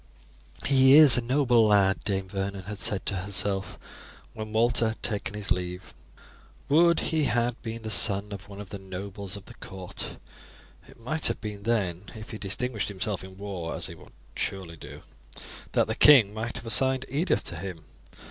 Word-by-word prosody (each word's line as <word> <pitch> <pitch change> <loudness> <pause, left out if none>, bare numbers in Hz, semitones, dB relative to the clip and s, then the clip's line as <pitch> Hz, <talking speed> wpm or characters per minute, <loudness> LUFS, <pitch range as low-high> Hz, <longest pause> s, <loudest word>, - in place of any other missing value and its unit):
"He 135 -1 +5
is 150 -4 +10
a 125 - +1
noble 120 -2 +3
lad," 100 -3 +3
Dame 95 -2 -1
Vernon 95 0 -4
had 105 +2 -7
said 100 - -3
to 100 - -1
herself 95 +1 -2 0.6
when 110 0 -7
Walter 115 +1 +2
had 110 - -5
taken 105 +1 -2
his 105 -1 -5
leave. 90 0 -3 0.8
"Would 170 +3 +5
he 155 -2 +2
had 120 0 0
been 115 0 -6
the 110 - -4
son 100 0 +3
of 100 0 -9
one 100 0 -10
of 100 -2 -9
the 100 - -7
nobles 95 +1 -7
of 100 - -13
the - - -12
court! 95 -2 -7 0.7
It - - -17
might 150 +7 -2
have - - -2
been 105 -2 -6
then, 100 -5 -1
if 110 +1 -9
he 110 - -7
distinguished 105 +3 -3
himself 100 0 -3
in 95 0 -12
war, 95 -5 -5
as - - -3
he - - -4
would - - -16 0.2
surely 95 -4 -3
do, 80 - -11 0.7
that - - +3
the - - -2
king 120 -9 +7
might 110 +2 -4
have 115 - -6
assigned 130 +3 +3
Edith 160 +6 0
to 85 - -4
him. 85 -2 -7
105 Hz, 185 wpm, -27 LUFS, 95-115 Hz, 0.8 s, is